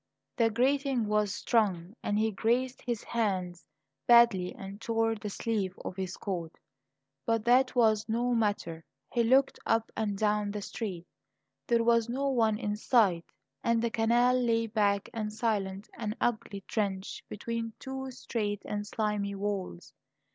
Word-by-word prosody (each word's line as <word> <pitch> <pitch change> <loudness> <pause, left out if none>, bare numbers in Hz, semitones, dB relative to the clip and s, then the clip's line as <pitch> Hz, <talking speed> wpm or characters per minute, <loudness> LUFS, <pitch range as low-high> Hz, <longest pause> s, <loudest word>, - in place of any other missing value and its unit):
The 230 -1 +3
grating 265 +1 +1
was 210 -1 +1
strong, 200 -4 0
and 205 - 0
he 220 +1 +2
grazed 245 +5 0
his 240 -4 -3
hands 185 -6 -2 0.4
badly 235 -7 +6
and 195 +2 -8
tore 225 0 +1
the 210 -1 -5
sleeve 200 -3 -2
of - - -4
his 190 0 -4
coat; 175 -5 -4 0.7
but 225 -2 0
that 255 +2 +4
was 220 -3 +3
no 240 +2 +1
matter. 205 -8 -1 0.3
He 235 - +3
looked 265 +4 +3
up 225 0 +1
and 210 -2 -1
down 210 0 +1
the 205 0 -4
street; 185 -7 -5 0.6
there 235 -1 +3
was 230 0 +3
no 275 +3 0
one 225 -5 +2
in 210 -2 -2
sight, 205 -8 +3 0.4
and 235 0 +2
the 230 0 0
canal 240 +3 +3
lay 230 -1 +2
black 205 -2 +1
and 215 -2 -3
silent, 210 -3 -2
an 215 -1 -2
ugly 215 -4 -1
trench 195 -1 -3
between 230 +1 -4
two 265 0 -6
straight 215 -5 -3
and 205 0 -3
slimy 205 -2 -1
walls. 195 - -4
220 Hz, 150 wpm, -30 LUFS, 200-235 Hz, 0.7 s, badly